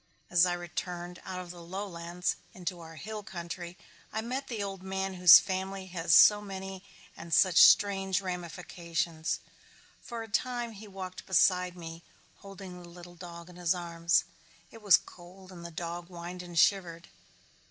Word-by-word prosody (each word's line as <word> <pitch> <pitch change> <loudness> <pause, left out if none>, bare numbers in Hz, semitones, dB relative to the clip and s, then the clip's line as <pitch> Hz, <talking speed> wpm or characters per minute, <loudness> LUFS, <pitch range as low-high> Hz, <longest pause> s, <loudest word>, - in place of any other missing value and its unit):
As 175 +1 +5
I 175 - 0
returned 175 0 -5
out 185 -1 -5
of 180 -1 -7
the 175 -1 -11
lowlands 175 -1 -3 0.2
into 180 -1 -4
our 165 -1 -11
hill 215 +7 -6
country 175 -2 -7 0.3
I 220 - -2
met 260 +4 -4
the 220 -4 -3
old 195 -2 -5
man 190 0 -3
whose 180 -2 +10
family 190 0 -4
has 165 -4 +3
so 210 +6 +8
many 195 -1 -7 0.3
and 170 - -10
such 180 0 +4
strange 195 -2 +5
ramifications. 170 -3 -3 0.6
For 235 -2 -6
a - - -9
time 240 +2 -1
he 215 0 -11
walked 185 -2 -8
beside 180 -1 +3
me 165 -1 -8 0.4
holding 195 -2 -10
the 175 - -12
little 175 0 -12
dog 170 -1 -10
in 180 -1 -14
his 175 0 +1
arms. 170 -1 +1 0.5
It 225 - -13
was 200 -5 +7
cold 185 +2 -14
and 175 -2 -10
the 170 - -6
dog 170 +1 -5
whined 175 0 -7
and 175 -1 -9
shivered. 175 -2 +2
180 Hz, 165 wpm, -30 LUFS, 170-195 Hz, 0.6 s, whose